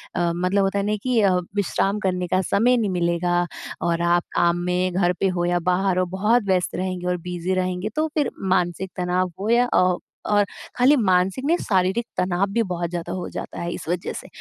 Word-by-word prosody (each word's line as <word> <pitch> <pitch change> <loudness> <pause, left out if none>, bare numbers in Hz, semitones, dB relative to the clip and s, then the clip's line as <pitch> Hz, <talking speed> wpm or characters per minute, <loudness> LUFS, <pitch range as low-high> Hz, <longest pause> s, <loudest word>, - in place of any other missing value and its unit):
अ, 170 -1 +1
मतलब 185 +3 +1
होता 195 +1 0
है 200 - -1
नहीं 210 0 0
कि 250 -3 +2
अ, 190 -3 +4 0.2
विश्राम 200 +1 0
करने 180 -2 -1
का 185 +2 +1
समय 235 +7 +3
नहीं 220 -4 0
मिलेगा, 175 0 +1 0.4
और 170 0 0
आप 175 0 +3
काम 170 0 +3
में 180 0 0
घर 180 -1 +2
पे 195 - +2
हो 175 - +1
या 175 0 +1
बाहर 180 +1 +1
हो 185 - +2
बहुत 210 +6 +1
व्यस्त 185 -1 +1
रहेंगे 185 -1 -3
और 180 0 0
बिज़ी 180 +1 -2
रहेंगे। 185 +2 -1
तो 310 +1 +1
फ़िर 295 -5 +1 0.2
मानसिक 180 +1 -1
तनाव 180 0 0
हो 205 +3 -2
या 240 +1 +4
अ, 180 -1 +3 0.3
और 205 -1 +3 0.3
खाली 255 +4 +5
मानसिक 190 +3 +1
नहीं 335 +4 +3
शारीरिक 190 +4 +1
तनाव 180 +1 +1
भी 230 - +2
बहुत 175 -3 -3
ज़्यादा 175 0 -4
हो 185 -1 -4
जाता - - -6
है 170 - -3
इस - - -8
वज़ह 180 0 -2
से। - - -12
185 Hz, 210 wpm, -23 LUFS, 175-200 Hz, 0.4 s, खाली